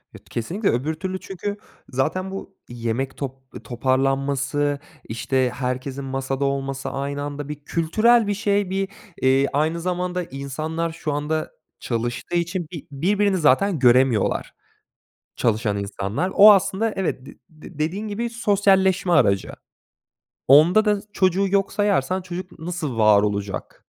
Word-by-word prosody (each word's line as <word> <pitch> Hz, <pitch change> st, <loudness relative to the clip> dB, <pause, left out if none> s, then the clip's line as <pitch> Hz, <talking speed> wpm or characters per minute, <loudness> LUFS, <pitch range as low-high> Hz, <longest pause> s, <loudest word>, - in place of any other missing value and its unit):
Evet. -, -, -15 dB
Kesinlikle 180 Hz, -, -1 dB
öbür 135 Hz, +7 st, 0 dB
türlü 185 Hz, +3 st, -4 dB
çünkü 200 Hz, +2 st, -5 dB, 0.3 s
zaten 185 Hz, +9 st, -1 dB
bu 195 Hz, 0 st, -8 dB
yemek 120 Hz, +2 st, -3 dB
top 135 Hz, -2 st, -4 dB, 0.3 s
toparlanması, 135 Hz, +3 st, 0 dB, 0.2 s
işte, 130 Hz, +3 st, 0 dB
herkesin 130 Hz, +2 st, -3 dB
masada 135 Hz, +1 st, -2 dB
olması 135 Hz, 0 st, -2 dB
aynı 140 Hz, +1 st, -3 dB
anda 145 Hz, 0 st, -5 dB
bir 150 Hz, -, -3 dB
kültürel 215 Hz, +9 st, +3 dB
bir 205 Hz, -, +1 dB
şey 205 Hz, -2 st, 0 dB
bir, 195 Hz, +1 st, -1 dB, 0.3 s
eee, 135 Hz, +1 st, +4 dB
aynı 155 Hz, +4 st, +1 dB
zamanda 180 Hz, 0 st, -2 dB
insanlar 155 Hz, +4 st, -4 dB
şu 155 Hz, -2 st, -4 dB
anda 150 Hz, +2 st, -2 dB, 0.3 s
çalıştığı 120 Hz, +7 st, -3 dB
için 170 Hz, 0 st, -1 dB
bir 165 Hz, -6 st, -8 dB
birbirini 195 Hz, +7 st, +1 dB
zaten 165 Hz, +3 st, +3 dB
göremiyorlar, 125 Hz, -3 st, +3 dB, 0.8 s
çalışan 110 Hz, -3 st, 0 dB
insanlar. 100 Hz, -, -3 dB
O 210 Hz, +2 st, +10 dB
aslında 200 Hz, +2 st, +2 dB
Evet, 165 Hz, -8 st, -2 dB
d 140 Hz, -, -11 dB, 0.2 s
d 155 Hz, 0 st, -14 dB
dediğin 185 Hz, +8 st, -2 dB
gibi 230 Hz, +3 st, -3 dB
sosyalleşme 195 Hz, -4 st, +2 dB
aracı. 100 Hz, -, +3 dB, 1.0 s
Onda 165 Hz, -, +6 dB
da 210 Hz, -1 st, +2 dB
s 210 Hz, -, -22 dB
çocuğu 190 Hz, +1 st, +2 dB
yok 195 Hz, 0 st, +1 dB
sayarsan 190 Hz, -3 st, +1 dB
çocuk 180 Hz, 0 st, -8 dB
nasıl 160 Hz, -7 st, -4 dB
var 105 Hz, -2 st, +5 dB
olacak? 100 Hz, -2 st, -4 dB
155 Hz, 135 wpm, -23 LUFS, 130-190 Hz, 1.0 s, O